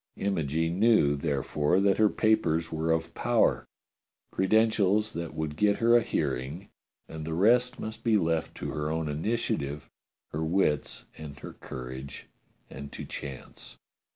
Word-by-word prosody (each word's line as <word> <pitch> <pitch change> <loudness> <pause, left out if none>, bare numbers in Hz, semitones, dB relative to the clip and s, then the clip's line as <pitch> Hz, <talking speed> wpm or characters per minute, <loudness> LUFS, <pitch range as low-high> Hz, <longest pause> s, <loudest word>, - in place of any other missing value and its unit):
Imogene 80 -2 -1
knew, 110 -11 +4
therefore, 75 +3 0
that 100 0 +3
her 110 -1 +5
papers 85 -8 +1
were 80 +1 -2
of 80 0 0
power, - - +1 0.7
creden 110 +4 +3
tials 105 +1 +1
that 85 -1 -5
would 80 -1 -3
get 105 +3 +3
her 115 +1 +4
a 120 - +6
hearing, 70 - -3 0.4
and 80 -1 -7
the 80 +1 -3
rest 125 +7 +3
must 110 +1 -6
be 115 -3 +4
left 80 -3 -1
to - - -5
her 75 0 -2
own 80 0 -1
initiative, 75 -3 -2 0.4
her 80 +1 -2
wits, 80 -4 0
and 75 -3 -8
her - - -8
courage, 65 +1 -8 0.4
and 70 +1 -9
to - - -7
chance. 70 -3 -8
80 Hz, 150 wpm, -28 LUFS, 75-105 Hz, 0.7 s, a